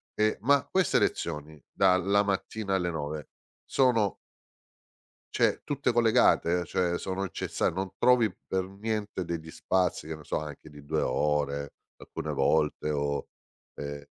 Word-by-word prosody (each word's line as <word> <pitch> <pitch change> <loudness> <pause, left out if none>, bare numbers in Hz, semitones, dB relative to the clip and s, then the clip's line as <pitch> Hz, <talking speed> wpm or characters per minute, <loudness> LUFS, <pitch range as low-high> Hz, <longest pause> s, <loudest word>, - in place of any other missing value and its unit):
E 110 0 +2
ma 140 +3 +3
queste 190 -4 +3
lezioni 75 -2 -2
dalla 95 +2 +3
mattina 100 +1 -2
alle 90 -2 0
9 75 -2 -4 0.4
sono 115 -7 +2 1.2
cioè - - +2
tutte 140 -4 0
collegate? 90 -7 +4
Cioè 85 0 0
sono 95 +1 -3
incessa 90 - -1
non 95 +2 -3
trovi 125 -4 +4 0.2
per 95 -1 -1
niente 105 -1 -3
degli 80 -2 -5
spazi, 90 -3 0
che 80 - -4
ne 75 - -13
so - - -1
anche 75 0 -8
di 75 -1 -13
2 - - -1
ore 70 -1 0 0.3
alcune - - -5
volte 75 -1 +1
o 70 -1 -1 0.5
ehm 70 0 -6
90 Hz, 135 wpm, -28 LUFS, 75-105 Hz, 1.2 s, collegate